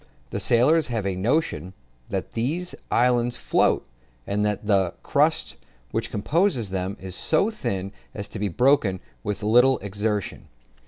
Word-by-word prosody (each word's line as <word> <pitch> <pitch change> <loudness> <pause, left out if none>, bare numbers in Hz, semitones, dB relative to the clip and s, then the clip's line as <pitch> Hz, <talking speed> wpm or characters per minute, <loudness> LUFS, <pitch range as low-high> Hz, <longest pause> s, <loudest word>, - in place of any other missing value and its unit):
The - - -2
sailors 150 +7 +4
have 115 -5 -2
a 95 -1 -1
notion 95 - -1 0.3
that - - -3
these 160 +10 -2 0.2
islands 120 0 +2
float, - - +2 0.4
and 105 +1 0
that 105 0 -1
the 95 -4 +2
crust - - +1 0.3
which - - -2
composes 130 - +1
them 95 +2 -2
is 95 -1 -6
so 180 - +2
thin 100 - -3 0.2
as 100 0 -4
to 110 - -7
be 105 - 0
broken 110 - +2 0.2
with 105 +1 -3
little 125 +5 +5
exertion. 105 0 -3
110 Hz, 145 wpm, -24 LUFS, 100-125 Hz, 0.4 s, little